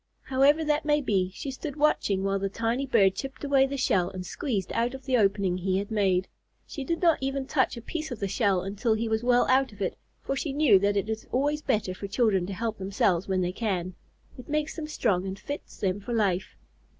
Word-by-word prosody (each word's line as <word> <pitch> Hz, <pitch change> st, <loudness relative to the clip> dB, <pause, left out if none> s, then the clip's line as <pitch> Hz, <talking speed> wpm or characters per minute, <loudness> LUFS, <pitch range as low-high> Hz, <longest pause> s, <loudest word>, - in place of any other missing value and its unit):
However 275 Hz, +4 st, +3 dB
that 300 Hz, 0 st, +1 dB
may 295 Hz, 0 st, +3 dB
be, 195 Hz, -9 st, 0 dB
she 275 Hz, -, -5 dB
stood 275 Hz, +2 st, -6 dB
watching 250 Hz, -10 st, +1 dB
while 195 Hz, 0 st, 0 dB
the 195 Hz, 0 st, -1 dB
tiny 230 Hz, +6 st, -1 dB
bird 205 Hz, -7 st, +4 dB
chipped 265 Hz, +5 st, -7 dB
away 275 Hz, -1 st, +4 dB
the 280 Hz, +1 st, -4 dB
shell 180 Hz, -8 st, +2 dB
and 185 Hz, -1 st, -7 dB
squeezed 200 Hz, -2 st, -3 dB
out 235 Hz, +3 st, 0 dB
of 265 Hz, -, -11 dB
the 260 Hz, -2 st, +1 dB
opening 195 Hz, -4 st, +2 dB
he 185 Hz, +1 st, 0 dB
had 200 Hz, +2 st, -3 dB
made. 190 Hz, -4 st, +2 dB, 0.4 s
She 280 Hz, -, -6 dB
did 335 Hz, +5 st, -2 dB
not 335 Hz, -2 st, +4 dB
even 270 Hz, 0 st, -2 dB
touch 260 Hz, -3 st, +1 dB
a 235 Hz, -, -8 dB
piece 310 Hz, +4 st, -4 dB
of 245 Hz, -5 st, -6 dB
the 200 Hz, -, -1 dB
shell 195 Hz, -3 st, +1 dB
until 205 Hz, +4 st, 0 dB
he 225 Hz, +1 st, -2 dB
was 220 Hz, 0 st, 0 dB
well 245 Hz, 0 st, +4 dB
out 265 Hz, 0 st, +3 dB
of 205 Hz, -, -16 dB
it, 190 Hz, -, -1 dB, 0.2 s
for 275 Hz, -, -3 dB
she 280 Hz, 0 st, -3 dB
knew 275 Hz, -9 st, +5 dB
that 200 Hz, +1 st, +1 dB
it 200 Hz, -, 0 dB
is 220 Hz, 0 st, -4 dB
always 290 Hz, +4 st, +1 dB
better 215 Hz, -9 st, 0 dB
for 200 Hz, +2 st, -6 dB
children 200 Hz, -4 st, +1 dB
to 200 Hz, -, -4 dB
help 225 Hz, +2 st, -3 dB
themselves 190 Hz, -2 st, +1 dB
when 190 Hz, -1 st, +1 dB
they 180 Hz, 0 st, 0 dB
can. 185 Hz, -5 st, -2 dB, 0.5 s
It 250 Hz, -, -11 dB
makes 300 Hz, 0 st, -1 dB
them 315 Hz, -2 st, -5 dB
strong 195 Hz, -10 st, 0 dB
and 190 Hz, 0 st, -4 dB
fits 285 Hz, +6 st, -7 dB
them 190 Hz, 0 st, -1 dB
for 220 Hz, +4 st, -5 dB
life. 195 Hz, -4 st, 0 dB
220 Hz, 235 wpm, -27 LUFS, 195-270 Hz, 0.5 s, knew